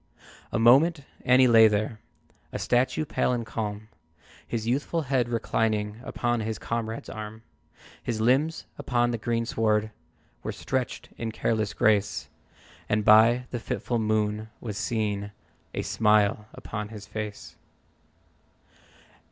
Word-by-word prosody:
A - - 0
moment, 140 +8 +5 0.2
and 125 +1 +5
he 130 - +7
lay 115 -2 +8
there 110 +1 -1 0.5
A - - -3
statue, 125 +5 +1
pale 140 - 0
and 120 -2 -2
calm. 105 -1 -4 0.6
His 115 -2 -3
youthful 145 +7 0
head 130 -3 0
reclining 110 -2 -1
Upon 120 -1 -1
his 110 0 -3
comrade's 115 -1 -4
arm. 110 +1 -8 0.6
His 115 -2 -3
limbs 135 +8 +2
upon 120 -1 +1
the 115 - -3
greensward 110 -2 0 0.5
Were - - -4
stretched - - -3
in 115 -1 -3
careless 110 -2 -1
grace, 105 -1 +2 0.6
And 105 0 +1
by 115 +4 +6
the 120 - -3
fitful 120 +1 -2
moon 110 0 0
was 110 -4 -5
seen 105 -2 -2 0.4
A - - -1
smile 105 -1 +2
upon 105 -1 -6
his 105 -2 -9
face. 105 -1 -6
110 Hz, 125 wpm, -27 LUFS, 105-120 Hz, 0.6 s, lay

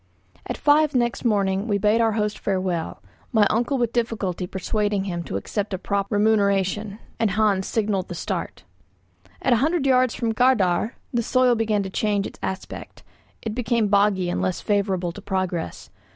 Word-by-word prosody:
At - - -3
five 295 0 +3
next 240 -1 0
morning 200 -3 +1
we 205 -2 +1
bade 210 +3 +3
our 225 -1 +2
host 210 -1 -1
farewell, 185 -4 -2 0.3
my 215 -2 +4
uncle 240 +5 +1
with 240 -2 0
difficulty 210 -7 -1
persuading 205 +1 -1
him 175 -3 -3
to - - -5
accept 200 - -3
a - - -4
proper 200 +2 -2
remuneration; 205 -1 +1 0.2
and 225 - +2
Hans 200 -2 +1
signalled 205 -4 -1
the 175 - -6
start. 165 - -4 0.8
At 255 - +4
a - - +4
hundred 305 +4 +1
yards 255 -2 +3
from 230 -1 -1
Gardär 220 -4 +2 0.2
the 240 - +2
soil 255 +2 +3
began 220 -3 +1
to 190 - -6
change 205 -1 0
its - - -9
aspect; 190 0 -6 0.4
it 220 - -3
became 230 -2 0
boggy 200 -2 +3
and - - -1
less 185 - -1
favourable 195 -4 0
to 205 - -10
progress. 185 - -3
210 Hz, 170 wpm, -23 LUFS, 190-230 Hz, 0.8 s, my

